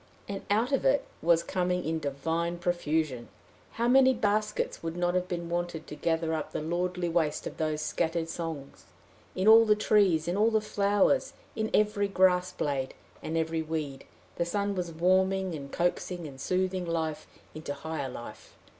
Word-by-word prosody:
And 200 -1 -4
out 225 +6 +2
it - - +2 0.2
was 170 -1 +3
coming 180 -1 -1
in 160 +1 0
a - - -4
divine 160 +4 -2
profusion! 160 -7 -1 0.5
How 235 +1 0
many 260 +1 +6
baskets 210 -1 0
would 165 +1 -4
not 175 0 +1
have 180 0 0
been 170 -2 -4
wanted 175 -2 -3
to - - -8
gather 165 0 0
up 155 -1 -3
the - - -1
lordly 180 +2 -1
waste 165 -3 0
of - - -6
those 155 -1 -1
scattered 165 0 -1
songs! 165 -4 -6 0.5
in 185 +2 0
all 225 +1 +9
the 215 -1 +4
trees, 200 -7 +3
in 175 - 0
all 215 +3 +4
the 220 -1 +2
flowers, 205 +4 +1 0.2
in 220 0 -1
every 210 -1 +2
grass 185 -2 +3
blade, 140 -6 -2 0.3
and 160 - -3
every 160 0 0
weed, 155 -4 -4 0.3
the 170 - +2
sun 200 +3 -1
was 180 -3 -3
warming 185 +2 +2
and 140 -3 -7
coaxing 175 0 -1
and 135 -2 -10
soothing 185 +1 0
life 160 -2 -2 0.3
into 155 -1 -6
higher 145 -1 -4
life. 120 -1 -10
175 Hz, 170 wpm, -29 LUFS, 160-195 Hz, 0.5 s, all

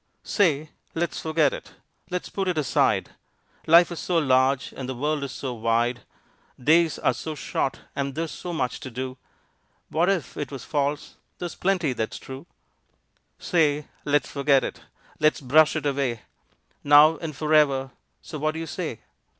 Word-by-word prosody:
Say! 155 -7 +1 0.2
Let's 170 +1 -1
forget 155 -3 +2
it! - - -9 0.4
Let's 180 -1 -3
put 195 -1 -3
it 180 -3 0
aside! 150 -4 +1 0.6
Life 170 +2 +7
is 170 - -5
so 175 - 0
large 130 -3 +2
and 130 -1 -6
the 130 - -3
world 150 +3 -1
is 140 - -4
so 130 -1 -5
wide. 115 +1 0 0.6
Days 160 +4 +3
are - - +1
so 155 -1 -5
short 135 -1 -2
and 140 -1 -2
there's 165 0 -2
so 180 - -6
much 125 -7 -2
to 135 - -7
do, 130 +1 -5 0.7
What 170 +5 +2
if 180 -9 -1
it 145 - -4
was 135 - -7
false 145 0 -2 0.2
there's 175 -1 -5
plenty 180 -7 0
that's 110 -2 -3
true. 135 +5 -10 0.9
Say! 150 -4 +1
Let's 145 0 +1
forget 140 -1 +3
it! - - -5 0.4
Let's 155 0 +3
brush 150 +4 +4
it 155 -2 -2
away 135 -5 -1 0.6
Now 150 +2 +7
and 160 -3 -6
forever, 145 -3 +2 0.3
so 155 -2 -7
what 155 +2 0
do - - -4
you 165 - -4
say? 160 - -5
150 Hz, 165 wpm, -25 LUFS, 135-160 Hz, 0.9 s, Life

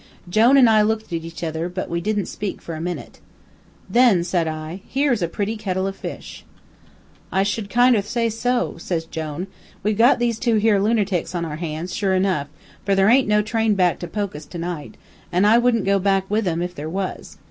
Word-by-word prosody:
"Jone 225 +9 +5
an' 255 -3 +7
I 220 -1 +5
looked 215 -2 -1
at 165 -1 -2
each 165 +1 -8
other, 160 +1 -2
but 185 +1 -4
we 170 0 -2
didn't 210 0 -1
speak 200 +2 -5
for 165 - -7
a 155 - -5
minute. 175 +1 -5 0.7
"'Then,' 235 -8 +4
says 175 -2 0
I, 155 +4 -5
'here's 270 -5 +1
a 170 - +1
pretty 205 +6 -3
kittle 190 -3 -2
o' 195 - -1
fish.' 195 - -8 0.9
"'I 190 - +2
should 205 0 -2
kinder 245 -2 +4
say 230 +3 -1
so,' 240 0 -1
says 165 -1 -3
Jone. 160 +2 -5 0.4
'We've 210 +1 0
got 240 +4 +6
these 235 -1 -1
here 235 -3 +3
two 205 -2 +3
lunertics 205 -5 0
on 170 -1 -1
our 155 -2 -5
hands, 165 +2 -5
sure 195 -3 +1
enough, 185 -7 +1 0.4
for 200 0 +1
there 195 +1 +4
ain't 255 +1 +4
no 210 0 +3
train 220 0 +1
back 180 -2 +2
to 175 - -5
Pokus 180 -5 -4
tonight, 170 -3 -6 0.3
an' 180 +3 +3
I 225 +3 +6
wouldn't 240 -3 +2
go 195 0 +3
back 195 0 +1
with 215 -1 +1
'em 170 0 0
if 180 0 -4
there 155 -1 -6
was. 190 +2 -5
195 Hz, 205 wpm, -22 LUFS, 175-220 Hz, 0.9 s, an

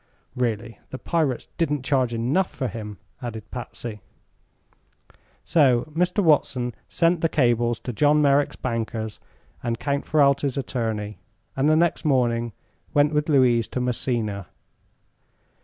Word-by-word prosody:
"Really, 115 -2 -2
the 130 - -6
pirates 150 -4 -1
didn't 150 -5 0
charge 130 -3 +2
enough 125 +11 +1
for 130 - -3
him," 105 -2 -7 0.2
added 110 -4 -7
Patsy. 120 -3 -7 1.4
So 135 -5 +3
Mr. 180 +4 +2
Watson 130 -6 +2 0.2
sent 170 0 +2
the 165 - +2
cables 120 -5 +2
to 125 - -5
John 150 +5 +4
Merrick's 145 -1 +3
bankers 115 -3 -3 0.4
and 120 -1 -2
Count 140 +3 -2
Ferralti's 140 -2 +2
attorney, 110 -5 -3 0.4
and 135 +3 +2
the 155 - +5
next 170 +1 +2
morning 120 -5 +1 0.4
went 145 +1 +4
with 150 +1 0
Louise 125 -6 +4
to - - -4
Messina. 115 -5 -2
125 Hz, 125 wpm, -24 LUFS, 115-145 Hz, 1.4 s, the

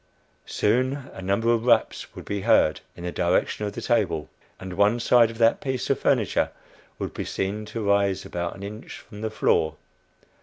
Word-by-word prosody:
Soon 130 +5 0
a - - -8
number 100 +5 +1
of 115 0 -1
raps 115 -2 +2
would - - -9
be 100 -1 -3
heard 95 -7 +3
in 85 - -10
the 90 - -3
direction 90 +4 0
of 100 - -5
the - - -6
table, 85 - 0 0.3
and 95 -1 -7
one 105 +5 +3
side 120 -1 +5
of 115 - -9
that 115 0 +3
piece 130 -3 -2
of - - +1
furniture - - +2 0.5
would - - -4
be - - -4
seen 100 +3 -3
to 110 0 -5
rise 100 -1 +2
about 85 0 -4
an 95 - -10
inch 105 +2 -8
from 105 0 -12
the 110 - -1
floor. 80 -6 +1
105 Hz, 190 wpm, -25 LUFS, 95-115 Hz, 0.5 s, side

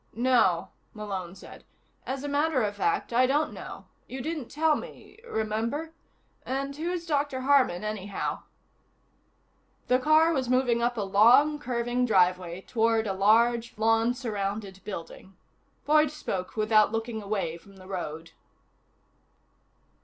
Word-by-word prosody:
"No," 235 -8 +2 0.3
Malone 195 -4 -5
said. 190 - -13 0.4
"As 270 +1 -3
a - - -3
matter 285 -2 +1
of 205 -1 -2
fact, 190 +3 -1
I 250 +2 +4
don't 295 +3 +1
know. - - -9 0.2
You 260 - -7
didn't 305 -1 -4
tell 310 +1 +2
me 400 +7 -10
remember? 230 +9 -2 0.5
And 275 +1 -3
who 320 +4 -3
is 355 -1 -3
Dr. 285 -4 -1
Harman, 260 -9 +3
anyhow?" 205 -2 -4 1.5
The 250 0 +4
car 310 +4 +4
was 260 -4 -1
moving 250 -2 +2
up 240 0 0
a 210 - -1
long, 245 +10 +5
curving 245 -1 -1
driveway 180 -3 +2
toward 225 +1 +1
a 195 - -1
large, 230 +4 +2
lawn 225 +2 +2
surrounded 200 -5 -4
building. 190 -1 -9 0.5
Boyd 305 +1 +4
spoke 195 -11 -5
without 215 -1 +4
looking 225 0 -3
away 195 -5 -3
from 195 +3 -18
the 185 -1 -14
road. 165 -4 -6
230 Hz, 135 wpm, -27 LUFS, 200-270 Hz, 1.5 s, long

